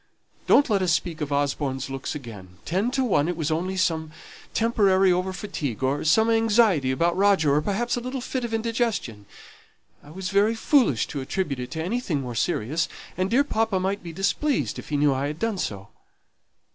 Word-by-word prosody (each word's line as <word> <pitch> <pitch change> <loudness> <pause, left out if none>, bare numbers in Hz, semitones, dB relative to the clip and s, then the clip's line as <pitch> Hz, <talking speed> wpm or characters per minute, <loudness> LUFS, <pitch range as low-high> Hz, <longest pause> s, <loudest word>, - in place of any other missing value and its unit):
Don't 285 - +5
let 205 -5 +1
us 180 -2 +1
speak 160 +1 -1
of 145 -1 -3
Osborne's 140 -2 -1
looks 135 +2 -5
again; 105 -10 -10
ten 190 +8 0
to 265 +1 0
one 175 - +2
it 175 -1 -2
was 160 -1 -1
only 185 +4 -1
some 160 -4 0 0.4
temporary 195 -5 +3
over 180 +1 0
fatigue, 145 - -4
or 135 +2 0
some 220 +8 +4
anxiety 220 - +3
about 170 +6 +1
Roger, 190 -7 +3
or 150 - +3
perhaps 215 +8 -1
a - - -2
little 255 +2 -4
fit 255 0 -3
of 235 - -3
indigestion. 225 - -2 0.8
I 145 - -15
was 185 +3 -5
very 205 +3 +3
foolish 225 - +3
to 140 - -4
attribute 140 -1 -2
it 125 - -5
to 160 -1 -3
anything 185 - -1
more 125 -2 -5
serious, 130 +8 -1 0.3
and 185 +1 -1
dear 260 +6 +4
papa 220 -8 0
might 195 +2 -1
be 170 - -8
displeased 195 - -1
if - - -10
he 150 - 0
knew 145 -1 +3
I 135 +2 -1
had 150 +1 -5
done 225 0 -2
so. 100 - -4
180 Hz, 195 wpm, -25 LUFS, 145-220 Hz, 0.8 s, Don't